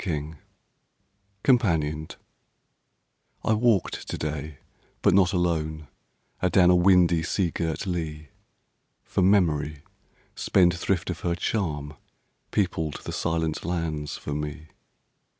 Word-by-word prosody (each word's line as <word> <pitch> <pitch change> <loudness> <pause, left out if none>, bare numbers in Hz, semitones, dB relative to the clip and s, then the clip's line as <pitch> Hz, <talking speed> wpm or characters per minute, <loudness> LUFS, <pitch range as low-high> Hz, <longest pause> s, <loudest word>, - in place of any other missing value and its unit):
135 75 -4 -4 1.0
COMPANIONED 80 - +1 1.3
I 110 - +3
WALKED 110 -4 +1
to - - -3
day, 75 -1 -4 0.5
but - - +5
not 95 0 +4
alone, 80 -5 -1 0.5
Adown 90 0 +5
a - - +5
windy, 90 -2 +5
sea 85 +1 0
girt 80 +4 -2
lea, 80 -5 -4 0.7
For - - -1
memory, 75 -6 +2 0.5
spendthrift 90 0 +2
of 85 - -6
her 85 0 -1
charm, 75 -7 -2 0.6
Peopled 80 -7 -1
the - - -5
silent 80 -1 -1
lands 80 -4 -3
for 75 - -5
me. 75 +1 -5
85 Hz, 105 wpm, -26 LUFS, 75-90 Hz, 1.3 s, but